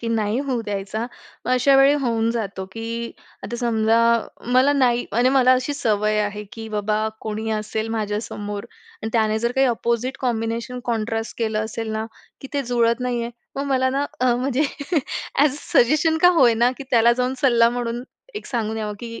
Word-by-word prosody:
की 230 - -3
नाही 220 -1 0
होऊ 245 -3 0
द्यायचा, 205 +1 -3 0.4
मग - - -2
अशावेळी 270 +2 +5
होऊन 230 -2 +1
जातो, 200 -5 -3
की 230 +1 -5 0.3
आता 240 - -4
समजा 225 -1 +2 0.6
मला 265 +3 +5
नाही 245 -4 +2
म्हणजे 245 +4 +3
मला 255 -1 +5
अशी 255 +3 0
सवय 215 -4 +1
आहे, 210 0 -3
की 225 -1 -7
बाबा 215 +1 0
कोणी 220 +1 -4
असेल 220 +1 -2
माझ्यासमोर 205 -1 -4 0.4
आणि 220 - -2
त्याने 220 -1 +2
जर 235 +2 -1
काही 265 0 +3
अपोजिट 235 +2 -1
कॉम्बिनेशन 235 +1 -2
कॉन्ट्रास्ट 225 -1 -2
केलं 220 -1 0
असेल 220 0 -5
ना, 220 +1 -2 0.3
की 270 - -9
ते 280 - +1
जुळत 235 -1 +1
नाहीये. 240 -1 -2 0.3
मग 275 - -1
मला 260 -1 +2
ना 280 +2 0 0.2
म्हणजे 255 +3 +2 0.7
अ‍ॅज 290 +1 +4
अ - - -7
सजेशन 310 +6 +3
का 355 - +9
होय 240 -3 +6
ना 240 +2 +3
की 275 - -7
त्याला 235 0 +5
जाऊन 250 +2 -1
सल्ला 235 -3 +5
म्हणून 240 0 -3 0.3
एक 420 - -6
सांगून 225 -3 -2
यावं, 210 -1 -3
की 230 -1 -7
235 Hz, 175 wpm, -22 LUFS, 220-255 Hz, 0.7 s, का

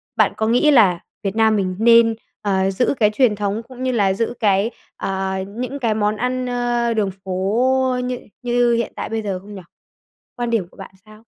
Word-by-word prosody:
bạn - - +3
có 220 - 0
nghĩ 250 +6 +4
là 195 -10 +5 0.2
Việt 195 +1 -2
Nam 220 -1 +3
mình 185 -3 -1
nên, 230 0 +5 0.3
ờ, 195 -1 +1
giữ 245 +8 +1
cái 210 -1 +5
truyền 215 -1 +2
thống 205 +2 -2
cũng 255 0 -9
như 255 - +1
là 200 -5 +2
giữ 230 +4 -2
cái, 205 +2 +2 0.3
ờ, 190 0 -2
những 250 +6 -5
cái 230 -4 +1
món 210 0 0
ăn, 250 +2 -1
ơ, 240 -1 0
đường 205 -3 0
phố 250 +8 +1
như 250 0 -3 0.2
như 240 -1 +2
hiện 235 - -2
tại - - -5
bây 225 0 -2
giờ 195 -3 -3
không 205 +2 -12
nhỉ? 190 - -8 0.8
Quan 240 -1 -2
điểm 220 -7 0
của - - -21
bạn 195 - -10
sao? 215 +1 -17
220 Hz, 205 wpm, -20 LUFS, 200-245 Hz, 0.8 s, là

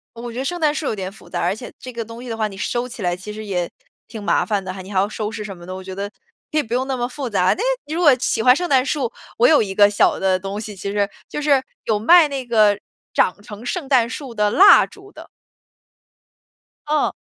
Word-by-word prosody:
我 235 +1 -7
觉 230 - -9
得 - - -1
圣 350 +4 -2
诞 305 -2 +2
树 310 - -3
有 - - -1
点 190 -2 -4
复 200 - -16
杂， - - -3
而 - - +1
且 245 +3 -9
这 255 - -8
个 230 -1 -4
东 230 +2 -10
西 250 - -9
的 225 - -3
话， 215 -1 0
你 195 - -11
收 240 +4 -2
起 235 -2 -9
来 175 -2 0
其 190 +4 -8
实 215 +1 -7
也 180 -4 -2 0.4
挺 220 - -8
麻 205 - +1
烦 205 -3 -1
的 185 0 -5
哈， 190 - -8
你 190 +2 -11
还 190 - +1
要 195 - +2
收 210 0 -4
拾 225 -1 -6
什 200 -2 -7
么 175 -1 -13
的， 185 - -6
我 190 - -7
觉 190 0 -7
得 200 +1 -4 0.4
可 310 - -1
以 305 - +3
不 230 -2 -6
用 255 +2 +1
那 265 -1 -2
么 240 0 -1
复 260 0 -5
杂。 190 -4 +1
但 - - -16
是 - - 0 0.2
你 305 - -6
如 340 - -1
果 295 -5 +7
喜 225 -2 0
欢 250 - +7
圣 355 +3 -2
诞 260 -2 +4
树， 275 -5 -1 0.3
我 240 - +5
有 305 -7 +5
一 195 -2 -5
个 205 +1 +6
小 205 - +2
的 190 -1 +2
东 195 +2 -5
西 215 -1 -7
其 200 +1 -5
实 200 -1 0 0.2
就 295 - -4
是 285 -3 +3 0.2
有 220 - +1
卖 325 +10 +6
那 275 -3 -4
个 215 -4 +4 0.4
长 185 - +1
成 210 +2 -10
圣 305 +3 -3
诞 250 -4 +3
树 260 -2 -7
的 210 -1 +2
蜡 400 - +8
烛 400 -1 -16
的。 - - -12 1.6
嗯。 300 0 +1
225 Hz, 295 characters per minute, -21 LUFS, 200-265 Hz, 1.6 s, 蜡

